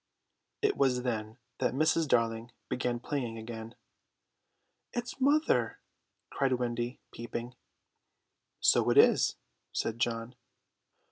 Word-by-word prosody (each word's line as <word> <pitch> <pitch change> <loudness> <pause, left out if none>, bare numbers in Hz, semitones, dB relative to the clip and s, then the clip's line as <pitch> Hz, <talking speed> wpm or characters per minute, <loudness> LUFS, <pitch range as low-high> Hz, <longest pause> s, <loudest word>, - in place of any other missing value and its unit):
It 415 -1 +2
was 125 -2 +2
then 110 -2 -3 0.2
that 125 -1 0
Mrs. 155 +2 +3
Darling 115 -1 +1 0.2
began 125 -1 -1
playing 120 -3 -3
again. 110 +1 -7 1.2
"It's 245 +3 -4
mother!" 295 +4 +3 0.5
cried 135 -2 +1
Wendy, 120 0 -2
peeping. 120 +1 -6 1.1
"So - - +4
it - - +3
is!" - - +6 0.4
said 115 +1 -2
John. 115 +1 -1
120 Hz, 105 wpm, -31 LUFS, 115-135 Hz, 1.2 s, is